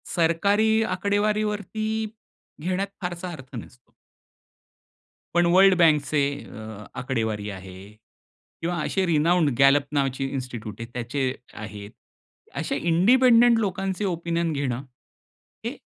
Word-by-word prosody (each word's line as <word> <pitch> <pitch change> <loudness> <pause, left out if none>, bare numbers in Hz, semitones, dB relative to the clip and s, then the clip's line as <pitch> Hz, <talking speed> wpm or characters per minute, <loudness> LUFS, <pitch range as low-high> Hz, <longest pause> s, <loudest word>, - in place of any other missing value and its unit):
सरकारी 200 +6 +3 0.2
आकडेवारीवरती 210 +2 -1 0.7
घेण्यात 185 +3 -1
फारसा 180 0 -4
अर्थ 135 -4 -10
नसतो. 120 +2 -11 1.4
पण 175 0 +4
वर्ल्ड 190 +1 +7
बँकचे 150 -3 +3 0.2
अ, 110 -1 -9 0.2
आकडेवारी 110 -5 -2
आहे 95 -1 -9 0.9
किंवा 175 +2 -1
असे 190 +3 0
रीनौंड 165 0 +3
Gallup 140 +1 +5
नावाची 135 -2 0
इन्स्टिट्यूट 125 -6 -5
आहे, 115 - -5
त्याचे 130 +2 -2 0.2
आहेत. 105 -1 -8 0.6
असे - - -2
इंडिपेंडेंट 235 +7 +5
लोकांचे 195 -1 -2
ओपिनियन 170 -1 -1
घेणं 135 -3 -2 0.8
हे - - -3
165 Hz, 100 wpm, -25 LUFS, 130-195 Hz, 1.4 s, वर्ल्ड